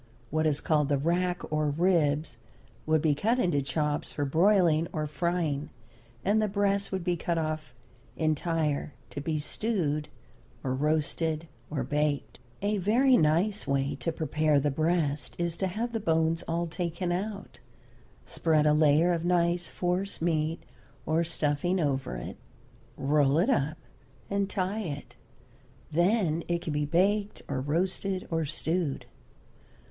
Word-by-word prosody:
What 155 +1 +2
is 145 -1 0
called 150 -3 +2
the 145 - +3
rack 175 +4 0
or 155 -1 +1
ribs 155 -2 +1 0.5
would 155 -1 +3
be 155 -2 +4
cut 220 - +1
into 175 - +2
chops 150 +2 -1
for 145 - -2
broiling 170 +1 +3
or 155 -2 -2
frying, 155 -2 -1 0.6
and 210 +3 +3
the 215 - +2
breast 200 0 +1
would 190 -2 -2
be 175 0 +1
cut 170 0 -1
off 155 -2 -3 0.4
entire 155 -2 0 0.2
to 145 - -5
be 155 +1 -1
stewed 155 -3 -1 0.5
or 130 -2 -1
roasted 155 +3 0 0.2
or 145 -4 -2
baked. 145 +2 -1 0.2
A 205 0 +1
very 245 +8 +4
nice 175 +6 +2
way 140 0 +1
to 165 - -1
prepare 155 -2 +1
the 145 +1 +1
breast 155 -2 0
is 170 -1 -1
to 190 - 0
have 225 +6 -3
the 225 - -1
bones 165 -3 +1
all 170 +1 0
taken 170 +1 -3
out, 200 +3 -4 0.7
spread 155 -2 +1
a 150 - +5
layer 155 +3 +4
of 165 -1 0
nice 175 0 +2
force 180 +2 -2
meat 160 -1 0 0.4
or 160 +1 +2
stuffing 165 +2 0
over 135 - -1
it, - - -6 0.6
roll 145 0 +3
it 190 +11 +3
up, 155 - 0 0.5
and 200 0 0
tie 195 +2 -1
it. 145 -7 -6 0.8
Then 170 -1 +2
it 170 0 -1
can 155 - -3
be 150 0 0
baked, 200 +6 +1
or 135 -2 -2
roasted, 185 +6 -1
or 165 -1 0
stewed. 160 0 -2
165 Hz, 145 wpm, -29 LUFS, 150-180 Hz, 0.8 s, a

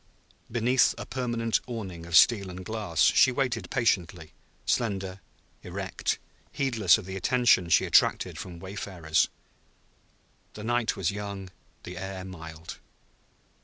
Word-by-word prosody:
Beneath 120 +3 +3
a - - -6
permanent 120 -3 -1
awning 95 -9 -6
of 85 - -2
steel 100 -3 +5
and 90 0 -8
glass 105 -7 -1
she 130 - +6
waited 125 -1 -1
patiently, 90 - 0 0.3
slender, 95 -5 -1 0.4
erect, - - -3 0.3
heedless 115 -9 +3
of 110 - -8
the 95 +1 -6
attention 110 -3 +3
she - - +4
attracted - - +3
from 90 -2 -7
wayfarers. 90 -3 -1 1.3
The 105 - -8
night 120 0 0
was 95 -2 0
young, 100 -2 -6 0.3
the 90 0 -8
air 95 0 -6
mild. 80 -3 -9
95 Hz, 125 wpm, -27 LUFS, 90-115 Hz, 1.3 s, she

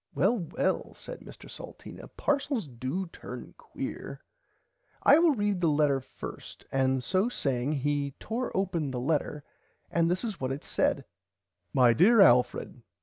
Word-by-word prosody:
Well 215 +5 +3
well 170 - -2
said - - -9
Mr - - -13
Salteena - - -10
parcels 280 - -1
do 130 +9 -3
turn 170 - -9
quear - - -7 0.8
I 290 - +7
will 330 -4 +4
read 205 -4 0
the 170 - +3
letter 145 -2 +3
first 130 0 -9
and 130 -1 +1
so 190 - +1
saying 135 - -1
he 145 -1 -1
tore 240 +3 -3
open 170 -6 0
the 130 -2 -3
letter 150 +2 -1 0.5
and 165 0 +2
this 180 +4 0
is 220 - -4
what 130 0 -1
it 135 +2 -4
said - - 0 0.7
My 125 -3 +5
dear 215 - +5
Alfred. 125 -10 +4
155 Hz, 145 wpm, -29 LUFS, 135-205 Hz, 0.8 s, I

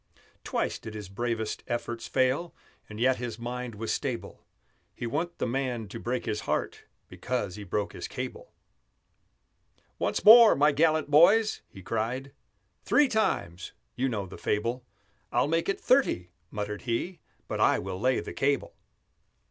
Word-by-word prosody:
Twice - - -2
did 110 -1 -9
his 105 -3 -7
bravest 110 +1 -3
efforts 120 -1 -3
fail, 130 +6 0 0.3
And 105 0 -8
yet 130 +2 +3
his 120 -1 -5
mind 120 0 -5
was 110 +2 -2
stable; 130 -5 -4 0.5
He - - -5
wa'n't 165 +8 -2
the - - -1
man 125 -3 -2
to 115 - -7
break 125 +2 -2
his 105 -2 -2
heart - - -2 0.2
Because 120 -8 -3
he 105 - -7
broke 100 +1 -2
his - - -6
cable. - - -6 1.5
"Once - - -1
more, 225 +1 +10
my 145 +2 +4
gallant 155 +1 +2
boys!" 205 +9 +5
he 95 - -13
cried; 120 +6 -2 0.5
"Three 295 -1 +4
times! 95 - -1 0.2
you 130 +2 0
know 105 -5 -2
the 95 - -11
fable 115 +4 -1 0.5
(I'll - - +2
make 165 +4 0
it 195 - 0
thirty," 245 - +2 0.2
muttered 105 0 -4
he, 125 +10 -3 0.3
"But - - -3
I - - +4
will 95 0 -5
lay 130 +3 +2
the - - -7
cable!"). 140 +1 0
125 Hz, 155 wpm, -28 LUFS, 110-145 Hz, 1.5 s, more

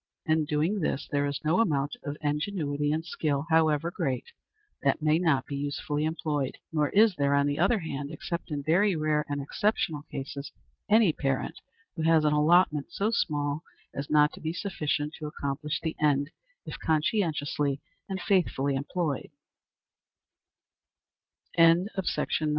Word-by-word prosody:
In 155 -1 +2
doing 155 +8 0
this, 150 -4 -1
there 145 0 +1
is 140 0 -3
no 160 +7 +3
amount 145 -9 +1
of 145 0 -4
ingenuity 150 -1 -1
and 160 +2 -1
skill, 150 -3 -1
however 160 0 +3
great, 130 -7 -3 0.5
that - - +2
may 155 +1 +4
not 155 -7 +2
be 140 - -5
usefully 145 +1 -2
employed; 150 -4 -2 0.2
nor 150 -2 +2
is 215 0 +5
there, 140 0 +2
on 140 0 +3
the 145 +1 -1
other 195 +7 +4
hand, 145 -6 -4
except 170 +3 -5
in 145 -2 -3
very 185 +6 +3
rare 155 -1 +1
and 145 0 -2
exceptional 155 +1 0
cases, 140 +1 -6 0.4
any 215 -6 +5
parent 135 -3 -2 0.4
who 165 - -4
has 160 -1 +4
an 150 - +3
allotment 150 -1 +3
so 210 +3 0
small 145 -7 0 0.3
as 140 +1 -5
not 150 0 +4
to - - -11
be 160 +1 -2
sufficient 155 -6 -2
to 155 - -4
accomplish 145 0 -3
the 160 -1 -3
end, 145 0 +2 0.3
if - - -7
conscientiously 150 -4 0 0.3
and 190 -1 -3
faithfully 155 -8 +1
employed. 145 +2 -2 2.3
CHAPTER 165 +3 +5
VIII. 165 -4 -1
150 Hz, 150 wpm, -28 LUFS, 145-165 Hz, 2.3 s, is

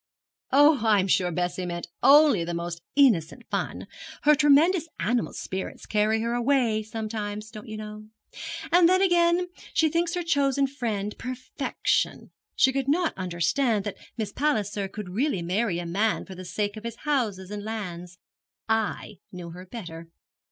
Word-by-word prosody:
'Oh, 290 +1 +6
I 215 -3 +4
am 190 - +1
sure 185 -1 +2
Bessie 180 +1 -2
meant 175 0 -5
only 280 - +6
the 170 0 -3
most 170 0 -4
innocent 240 - +3
fun; - - -3 0.4
her 300 - +6
tremendous 300 +4 +4
animal 230 +7 0
spirits 190 0 -6
carry 215 +1 +1
her 235 +1 -1
away 240 -3 +2
sometimes, 215 -1 -5
don't 215 -2 -10
you 215 0 -6
know. 215 0 -8 0.6
And 345 0 +6
then, 370 +1 +4
again, 350 -1 +3 0.3
she 320 - +4
thinks 340 +2 0
her 355 - -2
chosen 280 -4 +2
friend 220 -7 -3
perfection. 255 +1 -2 0.2
She 265 - +4
could 275 -1 -1
not 330 +4 +2
understand 195 - 0
that 205 - -4 0.2
Miss 215 -3 -3
Palliser 210 -9 0
could 200 -1 -7
really 210 - -1
marry 185 +2 0
a 175 - -4
man 205 +6 0
for 190 - -9
the 185 0 -9
sake 205 +3 -2
of 215 - -8
his 235 -1 -5
houses 215 -10 -1
and 205 0 -5
lands. 180 -5 -6 0.5
I 220 -2 -1
knew 175 -2 -8
her 180 +2 -10
better.' 170 -6 -8
215 Hz, 160 wpm, -26 LUFS, 190-275 Hz, 0.6 s, Oh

